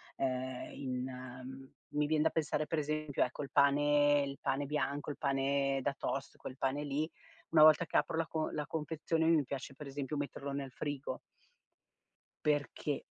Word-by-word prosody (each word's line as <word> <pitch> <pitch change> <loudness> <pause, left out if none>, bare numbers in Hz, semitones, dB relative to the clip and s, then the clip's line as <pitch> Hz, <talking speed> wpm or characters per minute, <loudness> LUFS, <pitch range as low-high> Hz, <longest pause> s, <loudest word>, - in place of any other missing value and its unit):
ehm, 130 -1 -2
in, 125 -2 -3
mhmm, 130 +1 -8 0.2
mi 150 0 +1
vien 155 0 +3
da 160 - +3
pensare 155 -1 0
per 160 +1 -1
esempio 155 -1 0
ecco 125 - -3
il 135 - -8
pane 145 0 +5
il 140 0 -6
pane 145 +2 0
bianco, 145 0 -1
il - - -7
pane 135 0 +1
da 140 - +1
toast, 140 0 -3
quel 130 - -8
pane 135 +2 0
lì, 145 +2 -1 0.4
una 155 - +5
volta 155 +2 +8
che 160 - -9
apro 165 - +2
la 165 - +1
con 155 0 -2
la 150 - -1
confezione 160 +2 -1
mi 165 -3 +5
piace 135 0 -6
per 150 - -8
esempio 140 +1 -4
metterlo 140 0 -4
nel 140 -1 -4
frigo. 145 +1 -4 1.3
Perché 145 -1 0
145 Hz, 175 wpm, -34 LUFS, 135-150 Hz, 1.3 s, volta